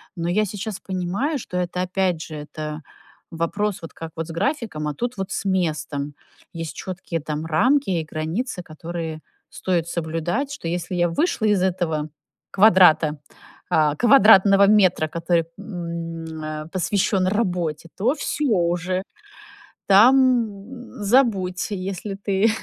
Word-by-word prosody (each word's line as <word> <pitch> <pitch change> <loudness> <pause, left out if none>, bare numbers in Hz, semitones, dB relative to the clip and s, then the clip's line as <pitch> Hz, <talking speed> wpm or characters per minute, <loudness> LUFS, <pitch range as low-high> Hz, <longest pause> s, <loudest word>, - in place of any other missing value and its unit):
Но 170 0 -2
я 210 +4 +2
сейчас 205 0 -5
понимаю, 195 - -2
что 180 - -6
это 180 0 -2
опять 185 -2 0
же, 155 - -8
это 150 +1 -6 0.5
вопрос 200 +5 -2
вот 165 - -9
как 165 0 -8
вот 165 0 -4
с - - -7
графиком, 190 - -2
а 150 - -2
тут 245 - -3
вот 190 0 -4
с - - -3
местом. 155 -6 -1 0.4
Есть 165 -1 -6
чёткие 185 -2 -5
там 150 +1 -4
рамки 255 - +2
и 170 -4 0
границы, 180 +8 -3
которые 165 -1 -6 0.3
стоит 175 -3 -1
соблюдать. 170 - -2
Что 285 - -6
если 175 +2 -3
я 175 -1 +2
вышла 235 - 0
из 205 -3 +3
этого 165 -5 -1 0.4
квадрата, 175 -7 +5 0.5
а, 150 -2 +3
квадратного 200 - +6
метра, 190 -6 +4
который, 165 +1 0
м, 165 -4 -6
э, 155 0 -5
посвящён 190 0 +1
работе, 180 -6 -1
то 230 +7 +2
всё 300 -1 -2
уже, 180 -1 0 0.8
там 245 +4 +6 0.6
забудь. 200 -6 +2
Если 195 +1 -4
ты 200 +2 +1
180 Hz, 135 wpm, -22 LUFS, 165-200 Hz, 0.8 s, квадратного